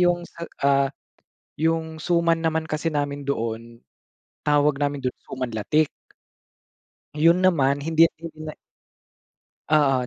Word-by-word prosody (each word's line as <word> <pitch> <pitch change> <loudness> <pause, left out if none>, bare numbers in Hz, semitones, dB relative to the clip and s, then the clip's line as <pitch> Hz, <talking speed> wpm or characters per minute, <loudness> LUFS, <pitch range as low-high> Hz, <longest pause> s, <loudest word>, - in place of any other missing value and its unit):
'yong, 175 -1 +2 0.4
ah, 140 -1 +4 0.7
'yong 160 0 0
suman 170 0 +1
naman 160 0 0
kasi 155 +1 -1
namin 145 -1 -2
doon 115 -3 -3 0.7
tawag 145 -1 +3
namin 145 -2 -1
do'n, 125 - 0 0.2
suman 130 -3 -4
latik. 145 +8 +1 1.2
Ayun 165 +4 +5
naman, 145 -7 +3
hindi 165 +2 +4
hindi 160 -2 -9
na 155 -1 -6 1.2
oo, 135 -5 +3
150 Hz, 115 wpm, -24 LUFS, 140-165 Hz, 1.2 s, Ayun